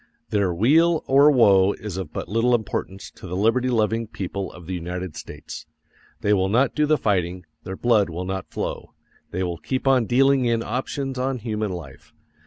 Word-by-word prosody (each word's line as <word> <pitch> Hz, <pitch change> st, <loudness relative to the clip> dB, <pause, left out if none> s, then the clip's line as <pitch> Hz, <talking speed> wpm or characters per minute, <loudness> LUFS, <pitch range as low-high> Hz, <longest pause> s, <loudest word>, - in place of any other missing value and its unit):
Their 100 Hz, -3 st, +1 dB
weal 155 Hz, -, +3 dB
or 140 Hz, +2 st, +6 dB
woe 100 Hz, -8 st, +5 dB
is 105 Hz, -4 st, -7 dB
of 95 Hz, -5 st, -5 dB
but -, -, -5 dB
little 115 Hz, +5 st, +2 dB
importance 100 Hz, -3 st, -4 dB
to -, -, -12 dB
the 90 Hz, -, -4 dB
liberty 115 Hz, +6 st, +2 dB
loving 115 Hz, -1 st, 0 dB
people 100 Hz, -3 st, -5 dB
of 90 Hz, -, -13 dB
the 95 Hz, -, -5 dB
United 90 Hz, -1 st, -5 dB
States. -, -, -9 dB, 0.5 s
They 105 Hz, -, +2 dB
will 95 Hz, -1 st, +1 dB
not 125 Hz, +6 st, +2 dB
do 150 Hz, 0 st, +1 dB
the 155 Hz, 0 st, +3 dB
fighting; 90 Hz, -, -1 dB, 0.2 s
their 95 Hz, 0 st, -6 dB
blood 110 Hz, -6 st, +2 dB
will 85 Hz, +2 st, -5 dB
not 95 Hz, 0 st, -4 dB
flow; -, -, -5 dB, 0.3 s
they 90 Hz, +2 st, -3 dB
will 85 Hz, -2 st, -3 dB
keep 130 Hz, 0 st, -3 dB
on 130 Hz, -3 st, +4 dB
dealing 135 Hz, +2 st, +3 dB
in 115 Hz, -1 st, +1 dB
options 130 Hz, +3 st, -3 dB
on 130 Hz, 0 st, -1 dB
human 110 Hz, -3 st, -3 dB
life. 80 Hz, -7 st, -10 dB
105 Hz, 190 wpm, -23 LUFS, 95-125 Hz, 0.5 s, or